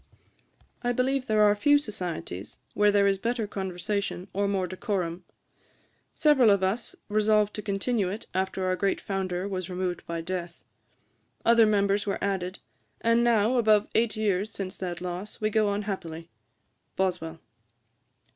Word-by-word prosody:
I 245 Hz, 0 st, 0 dB
believe 260 Hz, +2 st, 0 dB
there 215 Hz, -1 st, +4 dB
are 205 Hz, 0 st, +5 dB
few 290 Hz, +7 st, +5 dB
societies 180 Hz, -, -5 dB, 0.2 s
where 210 Hz, 0 st, +4 dB
there 200 Hz, -1 st, +4 dB
is 195 Hz, -1 st, +2 dB
better 235 Hz, +1 st, -1 dB
conversation 195 Hz, -1 st, -3 dB
or 200 Hz, +1 st, +1 dB
more 195 Hz, -2 st, 0 dB
decorum. 185 Hz, -1 st, -3 dB, 0.9 s
Several 280 Hz, -7 st, +5 dB
of 200 Hz, -2 st, +3 dB
us 205 Hz, +5 st, -1 dB
resolved 210 Hz, 0 st, +2 dB
to 210 Hz, -, -4 dB
continue 200 Hz, 0 st, 0 dB
it 210 Hz, +4 st, -6 dB
after 190 Hz, 0 st, -1 dB
our 185 Hz, 0 st, +1 dB
great 195 Hz, +1 st, 0 dB
founder 190 Hz, -1 st, -2 dB
was 185 Hz, -2 st, -4 dB
removed 180 Hz, -1 st, -3 dB
by 170 Hz, 0 st, -3 dB
death. 175 Hz, 0 st, -5 dB, 0.8 s
Other 230 Hz, -1 st, +6 dB
members 205 Hz, 0 st, +2 dB
were 195 Hz, -, 0 dB
added; 190 Hz, -1 st, -2 dB, 0.4 s
and 230 Hz, +1 st, +3 dB
now, 235 Hz, +1 st, +3 dB
above 215 Hz, -3 st, +4 dB
eight 220 Hz, -1 st, +1 dB
years 205 Hz, -1 st, 0 dB
since 195 Hz, -3 st, -5 dB
that 175 Hz, -2 st, -4 dB
loss, 180 Hz, +3 st, -5 dB
we 215 Hz, 0 st, 0 dB
go 215 Hz, -1 st, +3 dB
on 200 Hz, +1 st, -1 dB
happily. 170 Hz, -5 st, -6 dB, 0.6 s
BOSWELL. 175 Hz, -4 st, -1 dB
200 Hz, 150 wpm, -27 LUFS, 185-215 Hz, 0.9 s, Other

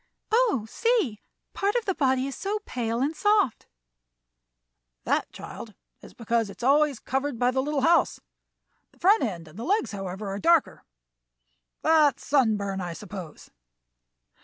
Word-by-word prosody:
"Oh, 440 Hz, -, +2 dB
see! 420 Hz, -, 0 dB, 0.3 s
part 405 Hz, +3 st, 0 dB
of 480 Hz, -, 0 dB
the 385 Hz, -, 0 dB
body 265 Hz, -5 st, +1 dB
is 275 Hz, -2 st, -5 dB
so 405 Hz, +2 st, -2 dB
pale 235 Hz, -1 st, -2 dB
and 295 Hz, +4 st, 0 dB
soft!" 415 Hz, -, +1 dB, 1.4 s
"That, -, -, 0 dB
child, -, -, -9 dB, 0.3 s
is -, -, -14 dB
because 230 Hz, -2 st, 0 dB
it -, -, -11 dB
is -, -, -8 dB
always 285 Hz, +1 st, +3 dB
covered 270 Hz, +2 st, -2 dB
by 245 Hz, +2 st, +2 dB
the 265 Hz, +1 st, 0 dB
little 290 Hz, 0 st, -1 dB
house. 335 Hz, +5 st, +3 dB, 0.7 s
The -, -, -26 dB
front 405 Hz, +5 st, +4 dB
end 175 Hz, -9 st, -3 dB
and 155 Hz, +7 st, -13 dB
the -, -, -4 dB
legs, 410 Hz, -, 0 dB
however, 195 Hz, 0 st, -5 dB
are 195 Hz, +1 st, -4 dB
darker. 335 Hz, +1 st, +2 dB, 1.0 s
That's 310 Hz, -3 st, +3 dB
sunburn, 210 Hz, -8 st, +1 dB
I 175 Hz, -1 st, -4 dB
suppose." 180 Hz, -4 st, -9 dB
265 Hz, 150 wpm, -26 LUFS, 215-330 Hz, 1.4 s, front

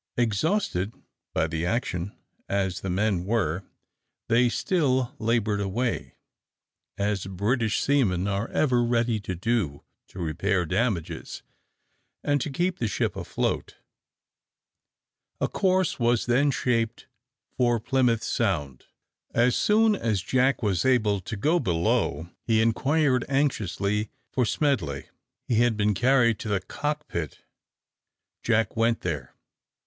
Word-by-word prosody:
Exhausted 115 Hz, -, 0 dB, 0.4 s
by 80 Hz, -, +1 dB
the 80 Hz, 0 st, -3 dB
action 90 Hz, -2 st, -2 dB, 0.3 s
as 95 Hz, -2 st, -1 dB
the 95 Hz, -, -4 dB
men 95 Hz, -1 st, +1 dB
were, 95 Hz, -4 st, 0 dB, 0.7 s
they 120 Hz, +2 st, +4 dB
still 130 Hz, -5 st, +1 dB
laboured 110 Hz, -2 st, +1 dB
away, 115 Hz, +5 st, -2 dB, 0.8 s
as 100 Hz, -2 st, -1 dB
British 110 Hz, +4 st, 0 dB
seamen 100 Hz, -10 st, +2 dB
are 100 Hz, +3 st, -1 dB
ever 125 Hz, -5 st, +2 dB
ready 115 Hz, -1 st, +1 dB
to 95 Hz, -2 st, -5 dB
do, 95 Hz, -7 st, -1 dB, 0.2 s
to -, -, -15 dB
repair 90 Hz, +2 st, 0 dB
damages, 95 Hz, -1 st, -2 dB, 0.8 s
and 145 Hz, -1 st, +1 dB
to -, -, -2 dB
keep 175 Hz, +6 st, -1 dB
the 115 Hz, -, 0 dB
ship -, -, -1 dB
afloat. -, -, -2 dB, 1.6 s
A -, -, +1 dB
course 185 Hz, -4 st, +1 dB
was 120 Hz, -1 st, +2 dB
then 130 Hz, +4 st, +3 dB
shaped 115 Hz, -4 st, 0 dB, 0.5 s
for 120 Hz, -2 st, +2 dB
Plymouth 120 Hz, -1 st, +1 dB
Sound. 75 Hz, -, -1 dB, 0.5 s
As 120 Hz, +1 st, +4 dB
soon 215 Hz, 0 st, +4 dB
as 110 Hz, -, -1 dB
Jack 130 Hz, +3 st, +2 dB
was 95 Hz, -5 st, +1 dB
able 110 Hz, -6 st, +3 dB
to 100 Hz, +4 st, -6 dB
go 155 Hz, -, +2 dB
below, 85 Hz, -, 0 dB
he 110 Hz, -1 st, +2 dB
inquired 130 Hz, +3 st, +2 dB
anxiously 105 Hz, -, 0 dB, 0.2 s
for 125 Hz, -, +1 dB
Smedley. 100 Hz, -, -1 dB, 0.4 s
He 115 Hz, -, +1 dB
had 120 Hz, -2 st, +3 dB
been 105 Hz, 0 st, +2 dB
carried 120 Hz, 0 st, +3 dB
to -, -, -6 dB
the 100 Hz, -2 st, +1 dB
cock 150 Hz, +7 st, -4 dB
pit. 80 Hz, -4 st, -5 dB, 1.0 s
Jack 115 Hz, -2 st, +1 dB
went 115 Hz, +1 st, +2 dB
there. 75 Hz, -8 st, -4 dB
115 Hz, 125 wpm, -26 LUFS, 95-125 Hz, 1.6 s, they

